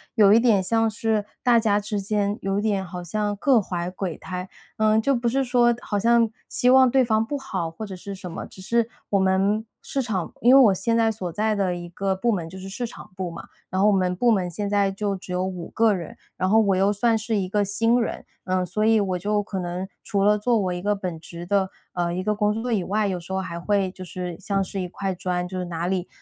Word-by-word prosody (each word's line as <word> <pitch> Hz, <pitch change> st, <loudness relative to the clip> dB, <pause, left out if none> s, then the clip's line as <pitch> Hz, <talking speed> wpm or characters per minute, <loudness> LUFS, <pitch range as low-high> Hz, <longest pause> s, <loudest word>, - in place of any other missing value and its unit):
有 205 Hz, -2 st, +6 dB
一 225 Hz, -, +7 dB
点 225 Hz, -5 st, +4 dB
像 225 Hz, +3 st, +2 dB
是 220 Hz, -1 st, 0 dB, 0.2 s
大 245 Hz, -2 st, +4 dB
家 210 Hz, -2 st, +3 dB
之 210 Hz, 0 st, -3 dB
间 205 Hz, +1 st, 0 dB
有 195 Hz, +1 st, 0 dB
一 -, -, -1 dB
点 200 Hz, -3 st, 0 dB
好 180 Hz, 0 st, -7 dB
像 205 Hz, +4 st, -2 dB
各 250 Hz, 0 st, +4 dB
怀 175 Hz, -2 st, -3 dB
鬼 180 Hz, -2 st, -4 dB
胎。 185 Hz, 0 st, -6 dB, 0.3 s
呃， 215 Hz, 0 st, +3 dB
就 275 Hz, +5 st, +2 dB
不 235 Hz, -1 st, 0 dB
是 270 Hz, +2 st, +1 dB
说 240 Hz, -1 st, +4 dB
好 205 Hz, -, -2 dB
像 230 Hz, +1 st, +4 dB, 0.2 s
希 250 Hz, -, +2 dB
望 260 Hz, -1 st, +6 dB
对 265 Hz, -1 st, +4 dB
方 220 Hz, -1 st, +2 dB
不 285 Hz, -, -3 dB
好 190 Hz, -12 st, -4 dB
或 215 Hz, +7 st, -7 dB
者 195 Hz, -2 st, -7 dB
是 200 Hz, +2 st, -7 dB
什 185 Hz, -2 st, -8 dB
么， 165 Hz, -, -6 dB
只 185 Hz, -, -13 dB
是 230 Hz, +3 st, +1 dB, 0.2 s
我 200 Hz, -, +4 dB
们 195 Hz, +3 st, +2 dB, 0.2 s
市 275 Hz, -, -2 dB
场 205 Hz, -8 st, -3 dB
因 245 Hz, +2 st, +6 dB
为 275 Hz, -, +9 dB
我 215 Hz, -6 st, +6 dB
现 215 Hz, +5 st, 0 dB
在 225 Hz, -1 st, +3 dB
所 190 Hz, -5 st, -4 dB
在 215 Hz, +4 st, 0 dB
的 195 Hz, -3 st, 0 dB
一 175 Hz, 0 st, -7 dB
个 190 Hz, +3 st, -1 dB
部 230 Hz, +5 st, +1 dB
门 170 Hz, -5 st, -3 dB
就 190 Hz, -, -10 dB
是 190 Hz, -, -8 dB
市 210 Hz, +6 st, -4 dB
场 230 Hz, -, -10 dB
部 185 Hz, -2 st, -4 dB
嘛。 -, -, -9 dB, 0.2 s
然 185 Hz, +1 st, -1 dB
后 205 Hz, -, +5 dB
我 210 Hz, -, +5 dB
们 185 Hz, -1 st, +1 dB
部 240 Hz, +7 st, +2 dB
门 190 Hz, -6 st, +1 dB
现 205 Hz, +4 st, -3 dB
在 200 Hz, -1 st, +2 dB
就 200 Hz, 0 st, -2 dB
只 185 Hz, -1 st, -9 dB
有 180 Hz, +1 st, 0 dB
5 180 Hz, -3 st, -5 dB
个 225 Hz, -2 st, +3 dB
人， 170 Hz, -4 st, -6 dB, 0.2 s
然 185 Hz, -, 0 dB
后 220 Hz, +2 st, +5 dB
我 195 Hz, -1 st, +3 dB
又 195 Hz, +2 st, +3 dB
算 225 Hz, +3 st, +2 dB
是 220 Hz, +1 st, -2 dB
一 190 Hz, -, -1 dB
个 205 Hz, +2 st, +1 dB
新 230 Hz, +4 st, +2 dB
人， -, -, -4 dB, 0.2 s
呃， 185 Hz, 0 st, 0 dB
所 205 Hz, +5 st, -2 dB
以 225 Hz, 0 st, +5 dB
我 185 Hz, -3 st, -1 dB
就 205 Hz, +2 st, 0 dB
可 195 Hz, -2 st, -4 dB
能 180 Hz, +2 st, -4 dB, 0.2 s
除 200 Hz, -2 st, 0 dB
了 210 Hz, +1 st, +4 dB
做 235 Hz, +2 st, +2 dB
我 185 Hz, -4 st, 0 dB
一 175 Hz, -, -4 dB
个 205 Hz, +1 st, +1 dB
本 180 Hz, -4 st, -5 dB
职 170 Hz, +1 st, -9 dB
的， 190 Hz, 0 st, +1 dB, 0.2 s
呃， 175 Hz, -1 st, -1 dB
一 185 Hz, +1 st, -2 dB
个 210 Hz, +1 st, +1 dB
工 210 Hz, 0 st, +1 dB
作 230 Hz, +3 st, -3 dB
以 195 Hz, -4 st, +1 dB
外， 210 Hz, +2 st, 0 dB
有 185 Hz, -2 st, -2 dB
时 170 Hz, +3 st, -11 dB
候 190 Hz, -, 0 dB
还 170 Hz, -2 st, -5 dB
会 195 Hz, 0 st, 0 dB
就 185 Hz, -, -10 dB
是 180 Hz, -1 st, -6 dB
像 195 Hz, 0 st, 0 dB
是 195 Hz, -, -5 dB
一 180 Hz, -, -3 dB
块 195 Hz, +1 st, -3 dB
砖， 180 Hz, 0 st, -2 dB
就 185 Hz, 0 st, -5 dB
是 180 Hz, -, -3 dB
哪 170 Hz, 0 st, -3 dB
里 185 Hz, -1 st, -1 dB
200 Hz, 280 characters per minute, -24 LUFS, 185-220 Hz, 0.3 s, 为